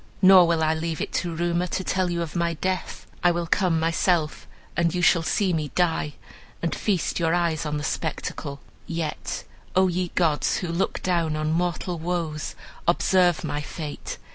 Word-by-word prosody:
Nor 185 -2 +9
will 165 -1 +2
I 155 0 +3
leave 160 0 -3
it - - -3
to 170 -2 -4
rumor 175 +1 0
to 190 +2 -2
tell 185 -1 0
you 170 -1 -1
of 165 - -7
my 170 -1 0
death. 185 +3 -3 0.2
I 175 - +6
will 175 0 0
come 170 -1 +2
myself, 165 -1 +1 0.3
and 170 +1 +1
you 180 - 0
shall 170 -1 +5
see 185 +3 +1
me 155 -3 -1
die, 165 -4 +1 0.4
and 165 - -1
feast 190 -5 0
your 165 0 +2
eyes 165 -3 0
on 150 0 -1
the 150 - -4
spectacle. 150 -2 -3 0.3
Yet, 165 -2 -3 0.3
O 190 0 +5
ye 180 0 -1
gods, 160 -5 +2
who 180 - -3
look 170 +3 -1
down 170 -4 +1
on 155 0 -1
mortal 175 +1 -1
woes, 165 -3 -3 0.3
observe 175 -2 +3
my 145 - -2
fate! 150 0 -6
170 Hz, 180 wpm, -25 LUFS, 160-180 Hz, 0.4 s, Nor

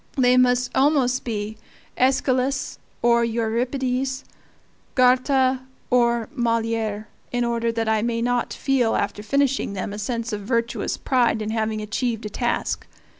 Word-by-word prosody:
They 250 -1 +5
must 250 0 +3
almost 265 -2 +3
be 215 -2 -4 0.4
AEschylus 260 0 +1 0.2
or 235 0 +4
Euripides, 250 +3 -1 0.7
Goethe 255 +1 +3 0.3
or 235 -2 +3
Moliere, 225 -4 -1 0.2
in 245 -1 0
order 235 -1 0
that 225 -1 -2
I 220 -1 +2
may 230 0 -1
not 245 +1 0
feel 260 -5 +1
after 205 +1 -2
finishing 275 -1 0
them 200 +1 -4
a 205 - -6
sense 230 +1 -3
of 205 - -3
virtuous 230 +2 -1
pride 245 -4 +2
in 215 0 -3
having 220 -1 -1
achieved 225 +1 -2
a - - -3
task. 240 +3 -2
235 Hz, 135 wpm, -23 LUFS, 225-255 Hz, 0.7 s, They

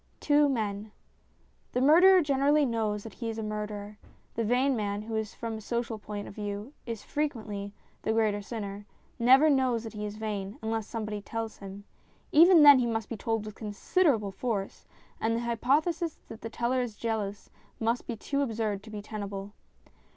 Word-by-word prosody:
VI - - -38
TWO 290 -1 +4
MEN 210 -4 -2 0.8
THE 250 - +1
murderer 355 +7 +7
generally 285 +1 +3
knows 220 -4 -1
that 225 - -9
he 230 -2 -4
is 225 - -4
a 220 - -3
murderer; 210 -1 -5 0.3
the 230 - -1
vain 250 +4 +2
man 205 -2 -2
who, 220 0 -2
from 225 +2 -6
a - - -8
social 235 0 -3
point 205 0 -6
of - - -9
view, 205 +5 -5
is 230 -3 -5
frequently 220 -9 -3 0.3
the - - 0
greater 215 -2 +1
sinner 205 -1 -6 0.3
never 260 +6 +6
knows 260 -5 +2
that 225 - -7
he 210 -1 -5
is 205 - -7
vain, 210 0 -4
unless 220 -1 -2
somebody 215 -2 -4
tells 225 +1 -5
him. 195 0 -9 0.5
Even 335 +1 +8
then 285 -2 +10
he 240 - +1
must 225 -2 -2
be 230 - -3
told 225 0 -2
with 215 - -7
considerable 220 - +1
force, 200 -1 -4 0.3
and 225 +1 +1
the 230 - -1
hypothesis 295 +8 0
that 225 - -9
the 225 - -5
teller 240 +3 0
is 235 -4 -4
jealous 210 -3 -3 0.3
must 230 +2 0
be 235 - -3
too 280 +6 -2
absurd 220 -6 -1
to 220 - -13
be 210 -1 -7
tenable. 205 -1 -6
225 Hz, 180 wpm, -29 LUFS, 210-250 Hz, 0.8 s, then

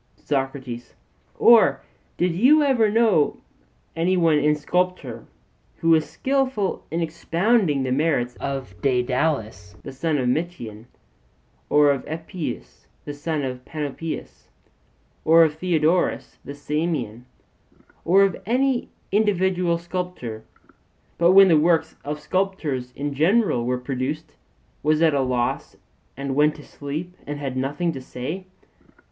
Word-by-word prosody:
SOCRATES: 135 -4 -4 0.4
Or 235 -2 +6 0.4
did 180 -1 +1
you 285 - +5
ever 250 -6 +3
know 220 -6 +4
of - - -2 0.6
any 175 +3 +1
one 165 -4 +3
in 150 +1 +3
sculpture, 150 -7 -2 0.5
who 165 - +2
was 160 -1 +3
skilful 265 -7 -1
in 165 +1 -2
expounding 170 - +1
the 130 - -2
merits 135 -4 0
of 135 -7 -4
Daedalus 125 - -1
the - - -7
son 150 +3 -1
of 130 -2 0
Metion, 125 -7 -3 0.8
or 145 -1 +5
of 135 -2 -2
Epeius 160 - -6 0.2
the 145 - -5
son 150 0 -3
of 125 -1 -5
Panopeus, 155 +2 -6 0.8
or 165 +1 +6
of 155 -2 +2
Theodorus 165 +1 0
the 140 - -8
Samian, 145 -6 -3 0.8
or 190 +4 +5
of 195 -1 0
any 250 +4 0 0.2
individual 190 -4 +1
sculptor; 170 -11 -5 0.8
but 170 +2 +5
when 195 0 +8
the 160 -4 +5
works 160 0 +2
of 150 +1 -4
sculptors 155 -10 -2
in 145 0 -3
general 160 - +2
were 125 0 0
produced, 135 +4 -4 0.5
was 155 +1 +2
at 160 -2 +4
a 140 - +2
loss 125 -2 -1 0.4
and 140 0 -3
went 150 +2 +3
to 150 - -12
sleep 155 +7 -6
and 145 0 -4
had 135 -3 -4
nothing 145 +6 -1
to 135 -4 -7
say? 150 +9 -6
155 Hz, 130 wpm, -23 LUFS, 135-180 Hz, 0.8 s, when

